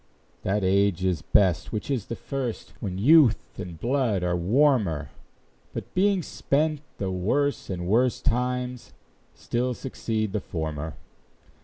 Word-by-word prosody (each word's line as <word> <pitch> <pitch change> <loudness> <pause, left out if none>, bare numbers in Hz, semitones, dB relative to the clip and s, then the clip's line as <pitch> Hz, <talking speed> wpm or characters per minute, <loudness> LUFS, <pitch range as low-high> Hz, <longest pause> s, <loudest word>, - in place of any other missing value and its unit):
That 100 +1 0
age 95 -1 +2
is 90 -5 +1
best 95 -2 +2
which 110 +5 -3
is 120 -8 -1
the 115 - -4
first, 130 -4 -4
When 95 -4 -4
youth 140 +4 +4
and 85 -3 -7
blood 120 -7 +1
are 90 0 +1
warmer; 105 - +2 0.6
But - - -6
being 190 -1 +2
spent, 150 +1 0 0.2
the 95 -2 -2
worse 115 +11 0
and 90 -2 -3
worst 120 +6 +2
Times 125 +1 -1 0.4
still 125 +1 -1
succeed 110 -5 -3
the 105 - -1
former. 80 -2 -4
110 Hz, 135 wpm, -26 LUFS, 95-130 Hz, 0.6 s, youth